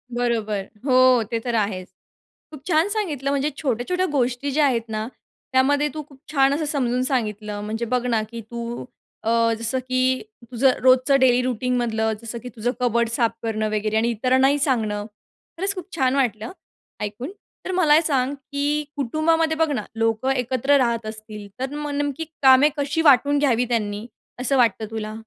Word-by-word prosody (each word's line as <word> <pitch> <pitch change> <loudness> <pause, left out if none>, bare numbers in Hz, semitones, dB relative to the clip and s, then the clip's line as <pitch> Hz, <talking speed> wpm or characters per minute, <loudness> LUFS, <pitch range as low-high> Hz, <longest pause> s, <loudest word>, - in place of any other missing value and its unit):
बरोबर, 220 -5 -1 0.2
हो, 255 -3 +5
ते 230 - 0
तर 235 0 -3
आहेच. 200 -4 -1 0.6
खूप 295 -3 -11
छान 325 +2 +3
सांगितलं 315 - -2
म्हणजे 280 +1 0
छोट्या-छोट्या 290 +7 -1
गोष्टी 255 +2 0
ज्या 295 +2 +3
आहेत 245 -4 +2
ना, 215 0 -3 0.5
त्यामध्ये 285 +3 +3
तू 310 - -4
खूप 275 -2 -18
छान 275 -1 +3
असं 310 +1 -1
समजून 255 -4 0
सांगितलं. 210 -5 -2
म्हणजे 220 +3 -3
बघ 250 0 +1
ना, 230 -3 +1
की 230 -1 -6
तू 235 0 -5 0.4
अ, 225 - 0 0.3
जसं 230 +3 -2
की 255 0 0 0.3
तुझं 255 +2 +4
रोजचं 260 +2 +5
डेली 250 -1 +4
रूटीनमधलं 240 -3 0
जसं 230 +1 -6
की 250 - -6
तुझं 230 +2 -1
कबर्ड 235 -1 +1
साफ 230 -1 +1
करणं 215 -1 -1
वगैरे 215 0 0
आणि 230 +2 +2
इतरांनाही 260 +5 +2
सांगणं, 220 -7 0 0.5
खरंच 390 +3 -1
खूप 365 -3 -6
छान 260 -1 +1
वाटलं, 230 -5 -1 0.5
ऐकून. 215 - -5 0.3
तर - - -3
मला 360 -5 +3
हे 315 - +6
सांग 275 -4 0
की 285 +2 -2
कुटुंबामध्ये 315 +4 +1
बघ 320 0 +2
ना, 245 -7 -2
लोकं 225 +3 0
एकत्र 260 +2 +2
राहत 235 -4 0
असतील 215 -1 -8
तर 265 +2 -3
मग 295 0 -4
नेमकी 290 +2 -2 0.2
कामे 265 +3 +7
कशी 290 +3 0
वाटून 285 +3 +3
घ्यावी 250 -4 +2
त्यांनी, 210 -2 -2 0.3
असं 265 +2 +1
वाटतं 230 -3 +2
तुला? 215 -1 -4
255 Hz, 170 wpm, -22 LUFS, 225-280 Hz, 0.6 s, कामे